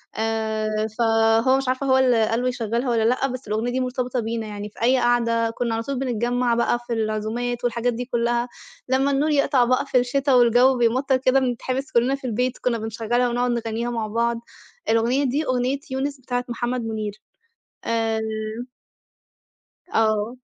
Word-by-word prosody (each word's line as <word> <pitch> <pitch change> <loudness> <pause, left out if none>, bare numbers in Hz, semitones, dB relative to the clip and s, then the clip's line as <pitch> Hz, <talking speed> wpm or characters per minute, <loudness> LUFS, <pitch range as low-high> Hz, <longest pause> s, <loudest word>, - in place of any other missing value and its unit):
آآ 220 -1 -1
فهو 225 +2 +3
مش 270 -1 -3
عارفة 260 +2 -1
هو 260 0 +4
اللي 245 -4 +3
قال 230 +2 0
له 250 - 0
يشغّلها 240 0 -1
والّا 230 -2 +2
لأ، 250 +4 +2
بس 255 -2 -7
الأغنية 220 +4 -1
دي 255 - -1
مرتبطة 255 -1 -2
بينا. 225 -1 -3
يعني 205 0 -6
في 210 - -16
أي 255 +3 +4
قعدة 230 -1 +2
كُنّا 230 0 -2
على 225 - -2
طول 275 +1 -3
بنتجمّع 245 -1 0
بقى 235 0 +1
في 240 - -2
العزومات 225 +2 -2
والحاجات 245 0 0
دي 245 +2 -4
كُلّها، 240 0 0 0.4
لمّا 265 +2 +2
النور 280 +3 +1
يقطع 280 -3 +3
بقى 255 +3 +1
في 275 - +1
الشتا 275 +3 +1
والجَو 245 +1 +5
بيمطَّر 255 +3 +2
كده 260 +1 +3
بنتحبس 260 +2 -2
كُلّنا 245 +3 +2
في 275 -2 -7
البيت، 250 +2 -1
كُنّا 245 -2 -1
بنشغّلها 225 +2 -1
ونقعد 245 +1 0
نغنّيها 235 0 -2
مع 230 -2 -2
بعض. 235 +2 0 0.5
الأغنية 235 +5 +2
دي، 280 +4 0
أغنية 255 +1 0
يونس 275 +1 -2
بتاعة 245 0 -2
محمد 240 +1 -2
مُنير. 215 -2 -3 0.7
آآ 225 -1 0 1.7
آه. 220 +1 +1
240 Hz, 170 wpm, -23 LUFS, 225-255 Hz, 1.7 s, والجَو